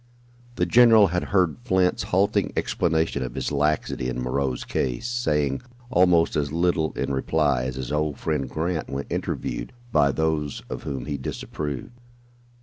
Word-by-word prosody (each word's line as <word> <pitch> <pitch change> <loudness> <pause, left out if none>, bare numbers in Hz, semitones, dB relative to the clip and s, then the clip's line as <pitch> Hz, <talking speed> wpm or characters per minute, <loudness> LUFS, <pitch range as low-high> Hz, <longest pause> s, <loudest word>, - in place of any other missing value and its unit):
The 90 - +1
general 115 0 +6
had 90 +1 -1
heard 90 -5 +2
Flint's 95 -6 +2
halting 95 +2 +2
explanation 80 -3 0
of 60 -2 -4
his - - -2
laxity 75 -4 0
in 65 0 -3
Moreau's 65 +1 -1
case, 65 - -2
saying 75 - 0 0.3
almost 90 -6 +4
as 70 -1 0
little 85 -1 +1
in - - -2
reply 70 -2 +1
as 65 0 -3
his 65 0 -5
old 75 -1 0
friend 75 -5 -2
Grant 80 +2 -2
when 70 +1 -3
"interviewed" - - -3 0.2
by 70 -8 +4
those 80 -1 -1
of - - -4
whom 65 -3 -4
he 75 -1 -3
disapproved. 70 - -5
75 Hz, 150 wpm, -24 LUFS, 70-90 Hz, 0.3 s, general